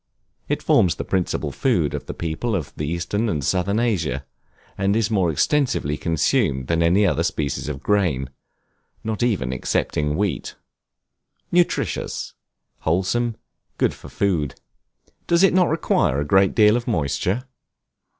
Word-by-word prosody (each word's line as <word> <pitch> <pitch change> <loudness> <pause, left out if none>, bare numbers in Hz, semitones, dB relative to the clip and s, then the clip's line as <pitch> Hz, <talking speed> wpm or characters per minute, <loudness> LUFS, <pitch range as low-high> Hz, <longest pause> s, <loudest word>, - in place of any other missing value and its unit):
It - - -1
forms 90 - +4
the - - -4
principal 95 -2 -1
food - - +1
of - - -5
the - - -5
people 85 +8 -2
of 85 -7 -4
eastern 85 +8 -1
and 75 -7 -1
southern 95 +7 +1
Asia, 105 -10 -1 0.5
and 100 +1 +1
is 115 0 +1
more 95 -5 +2
extensively 100 - +1
consumed 70 -4 +1
than 85 +4 0
any 90 +5 +4
other 80 -8 +1
species 75 0 -2
of 70 -1 -6
grain, 80 -11 +1 0.7
not 110 0 -3
even 95 - 0
excepting 75 +3 -1
wheat. 95 -8 -2 1.0
Nutritious, 175 0 0 0.5
wholesome, 95 +8 0 0.4
good - - +2
for - - -12
food. 85 -9 0 0.7
Does 170 +2 +4
it 195 - +5
not 180 -2 +4
require 150 - +1
a 75 - -1
great 95 +4 +3
deal 105 0 +6
of 120 -1 -2
moisture? 90 - 0
95 Hz, 140 wpm, -22 LUFS, 75-110 Hz, 1.0 s, deal